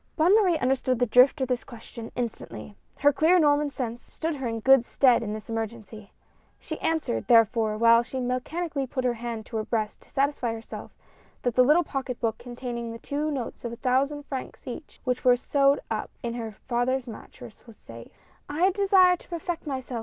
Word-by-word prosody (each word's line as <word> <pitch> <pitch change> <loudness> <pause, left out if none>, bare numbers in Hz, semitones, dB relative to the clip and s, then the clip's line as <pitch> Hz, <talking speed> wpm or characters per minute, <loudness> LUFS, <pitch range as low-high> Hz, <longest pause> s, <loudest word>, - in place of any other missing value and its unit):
Bonne 340 +4 +4
Marie 375 -6 +4
understood 255 -1 +1
the 245 - +2
drift 250 +5 +5
of 260 - +1
this 250 -1 -1
question 230 -1 -10
instantly. 205 - -5 0.2
Her 290 +1 +4
clear 325 +6 +4
Norman 295 -2 +3
sense 240 -4 -5
stood 320 -2 -4
her 265 -2 -3
in 225 -1 -3
good 265 +1 +6
stead 250 -1 +3
in 215 -2 -4
this 215 0 -7
emergency. 220 -2 -6 0.5
She 315 - -6
answered, 315 - -1
therefore, 225 -2 +4
while 230 +1 +6
she 260 +2 -5
mechanically 275 +4 -2
put 255 +1 -3
her 245 - +2
hand 230 -1 -5
to 225 - -5
her 215 - -1
breast 215 -2 -2
to - - -22
satisfy 275 -4 0
herself 225 0 -9 0.5
that 245 - 0
the 255 - +5
little 305 +7 +4
pocket 265 -5 -4
book 225 -3 -1
containing 240 -1 -6
the 230 - -7
two 290 +5 -3
notes 265 -6 -5
of 235 -1 -4
a - - -5
thousand 270 +4 0
francs 265 -3 -7
each, 265 +4 -8
which 250 -1 -1
were 250 - +6
found 245 - -1
sewed 280 +1 +3
up 215 - -2
in 235 -1 -2
her 225 -2 -5
father's 250 +1 0
mattrass, 235 0 -12
was 230 - -14
safe: 115 0 -12 0.4
"I 340 +6 +2
desire 380 -2 +4
to - - -19
perfect 340 -1 -4
myself. 260 -3 -4
250 Hz, 200 wpm, -26 LUFS, 230-285 Hz, 0.5 s, good